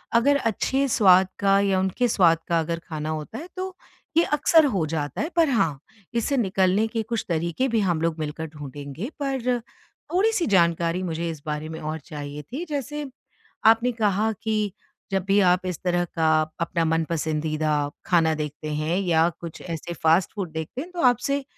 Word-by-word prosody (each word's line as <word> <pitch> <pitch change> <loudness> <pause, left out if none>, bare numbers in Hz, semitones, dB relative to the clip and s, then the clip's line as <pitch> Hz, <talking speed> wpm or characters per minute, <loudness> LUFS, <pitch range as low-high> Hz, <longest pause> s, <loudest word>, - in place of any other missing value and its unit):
अगर 280 +5 +5
अच्छे 265 +3 0
स्वाद 190 -5 +5
का 195 0 +4
या 195 -2 +2
उनके 190 +6 +1
स्वाद 170 -7 +4
का 170 -1 +2
अगर 165 +1 -2
खाना 155 -1 -4
होता 155 +8 -4
है, 325 - -7
तो 370 0 -5 0.4
ये 335 - +6
अक्सर 300 +1 +4
हो 195 - +1
जाता 150 -2 -3
है 310 - -1
पर 330 -3 +4
हाँ, 165 - +1 0.3
इससे 235 +4 0
निकलने 195 0 +2
के 225 0 -2
कुछ 225 +1 -3
तरीके 170 +10 0
भी 230 -3 +1
हम 175 -5 0
लोग 165 -1 -1
मिलकर 155 +1 -4
ढूँढेंगे, 145 - -7
पर 255 -3 0 0.5
थोड़ी 420 +5 +3
सी 375 -6 0
जानकारी 170 -1 +2
मुझे 165 -1 -2
इस 155 -3 -6
बारे 150 +1 -3
में 160 - -6
और 155 +1 -4
चाहिए 145 -1 -7
थी 320 +7 -4
जैसे, 290 0 -4 0.6
आपने 225 +3 +5
कहा 215 -1 +1
कि 215 -2 0 0.4
जब 190 -2 0
भी 200 +1 +3
आप 180 -1 +3
इस 180 -4 -3
तरह 175 -1 +1
का 160 -1 0 0.3
अपना 170 0 0
मनपसंदीदा, 155 -2 0 0.2
खाना 165 -3 +3
देखते 150 0 -5
हैं 155 +5 0
या 170 -3 +3
कुछ 170 -2 -8
ऐसे 170 0 -5
फ़ास्ट 165 +3 +2
फ़ूड 185 -6 -4
देखते 160 - -5
हैं, 345 - -8
तो 350 - -4
आपसे 265 +3 +2
180 Hz, 180 wpm, -24 LUFS, 160-230 Hz, 0.6 s, ये